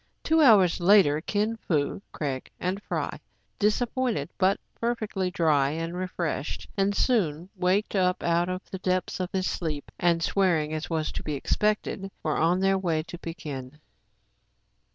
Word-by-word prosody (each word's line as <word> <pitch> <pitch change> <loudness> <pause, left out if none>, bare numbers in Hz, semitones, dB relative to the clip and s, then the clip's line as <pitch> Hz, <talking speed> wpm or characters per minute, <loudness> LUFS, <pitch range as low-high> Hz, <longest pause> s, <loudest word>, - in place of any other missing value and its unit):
Two 320 0 +3
hours 205 - +6
later, 175 -5 +5
Kin 210 +5 -1
Fo, 155 -3 -1
Craig, 135 -4 -4
and 185 +3 -2
Fry, - - -3 0.4
disap 215 +3 +1
pointed, 245 - -1
but 195 +1 +3
perfectly 215 -5 -2
dry 150 -6 +2
and 165 +3 -3
refreshed, 175 -5 -3
and 200 0 +1
Soun 180 - +1
waked 190 +3 +1
up 180 -1 +1
out 170 +1 +2
of 185 +1 -4
the 190 - -5
depths 185 0 -1
of 180 -1 -2
his 190 -1 -1
sleep, 155 -5 -3
and 170 -1 +2
swearing 165 -6 +1
as 155 0 -4
was 160 -2 -1
to - - -5
be 150 - -3
expected, 200 +5 -1
were 155 - 0
on 175 +3 +2
their 195 0 +3
way 165 -4 0
to 175 +2 -9
Pekin. 150 -5 -7
180 Hz, 155 wpm, -27 LUFS, 155-195 Hz, 0.4 s, hours